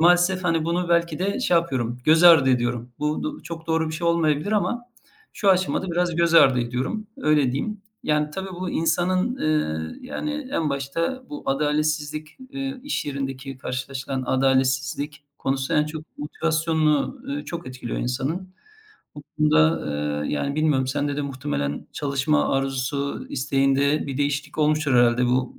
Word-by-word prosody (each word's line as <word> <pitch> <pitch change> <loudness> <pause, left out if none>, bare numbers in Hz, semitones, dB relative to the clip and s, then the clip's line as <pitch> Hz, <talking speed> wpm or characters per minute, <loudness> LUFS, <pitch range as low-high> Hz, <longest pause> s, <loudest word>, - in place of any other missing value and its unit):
maalesef, 175 +2 +4
hani, 165 -2 +1
bunu 170 +1 -1
belki 170 -2 +2
de 200 +6 -1
şey 175 -8 +3
yapıyorum, 125 -8 -1
göz 160 +2 +5
ardı 160 -6 +8
ediyorum. 120 -1 -1
Bu 155 - -2
d - - -23
çok 165 -1 -8
doğru 160 -1 +1
bir 155 - -4
şey 170 +2 -2
olmayabilir 165 +2 +1
ama 215 +4 0 0.5
şu 200 - 0
aşamada 185 0 +1
biraz 175 -1 0
göz 170 0 +2
ardı 130 -6 +7
ediyorum, 130 - -3
öyle 150 -4 +2
diyeyim. 210 +9 -3 0.2
Yani 150 0 +1
tabii, 190 +5 -5
bu 185 - -2
insanın, 185 +8 +1
eee, 80 - -1
yani, 295 -1 -4
en 155 -3 0
başta 165 - -2
bu 295 - -6
adaletsizlik, 150 +1 -1
eee, 275 -1 -4
iş 290 - -2
yerindeki 135 -1 -5
karşılaşılan 130 +1 -4
adaletsizlik 135 +3 +1
konusu. 135 0 -1
En 150 0 +4
çok 155 0 -9
motivasyonunu, 155 - 0
ııı, 285 +2 -4
çok 170 -4 -6
etkiliyor 125 -2 -5
insanın. 160 +10 -3 0.6
Bu 145 - -9 0.2
konuda, 155 +1 +4 0.4
eee, - - -3
yani, 140 - -1
bilmiyorum 150 -4 +2
sende 145 +2 -1
de 145 - -1
muhtemelen 130 - -3
çalışma 135 - +1
arzusu, 135 +1 -2
isteğinde 135 +2 +1
bir 135 -2 -4
değişiklik 145 +1 -2
olmuştur 155 -1 +2
herhâlde 120 0 +4
bu 125 +1 0
150 Hz, 150 wpm, -24 LUFS, 135-170 Hz, 0.6 s, ardı